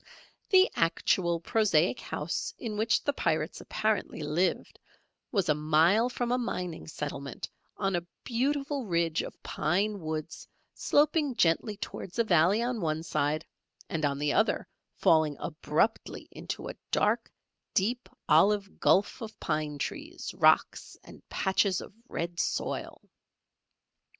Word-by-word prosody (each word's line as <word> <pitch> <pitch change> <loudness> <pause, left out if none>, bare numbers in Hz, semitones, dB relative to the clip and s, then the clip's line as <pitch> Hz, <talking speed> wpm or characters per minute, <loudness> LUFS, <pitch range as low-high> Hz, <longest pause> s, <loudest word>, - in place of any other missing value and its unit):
The 380 -1 +7
actual, 170 +1 +1
prosaic 195 +2 +2
house - - -3
in 225 -4 -5
which 220 +2 +2
the 285 - +1
Pirates - - -1
apparently 215 -7 -1
lived, 155 +5 -1 0.5
was 195 -6 +1
a 150 - +4
mile 160 +10 +3
from 245 -1 -2
a 250 - +2
mining 180 -8 -4
settlement 140 -3 -5 0.3
on 195 -2 0
a 175 0 -3 0.2
beautiful 275 +1 -1
ridge 170 -2 +1
of - - -9
pine 200 +6 0
woods 155 -2 -5 0.3
sloping 295 -2 +2
gently 195 +3 +2
towards 205 -3 -7
a 230 - +4
valley 185 +3 +4
on 245 0 -1
the - - -5
one 160 0 -1
side, 155 0 -1 0.4
and 160 -2 -2
on 140 -1 +1
the 145 0 0
other - - +2 0.3
falling 155 -3 +3
abruptly 160 +6 -1
into - - -6
a - - -5 0.2
dark - - +1 0.4
deep 240 +6 0 0.2
olive 195 +5 +3
gulf 200 +5 +3
of 220 -1 -8
pine 150 -2 -2
trees, - - -5
rocks, - - +2
and - - -14
patches 190 -1 +1
of - - -10 0.2
red 170 +1 -4
soil. - - -2
180 Hz, 135 wpm, -29 LUFS, 155-225 Hz, 0.5 s, The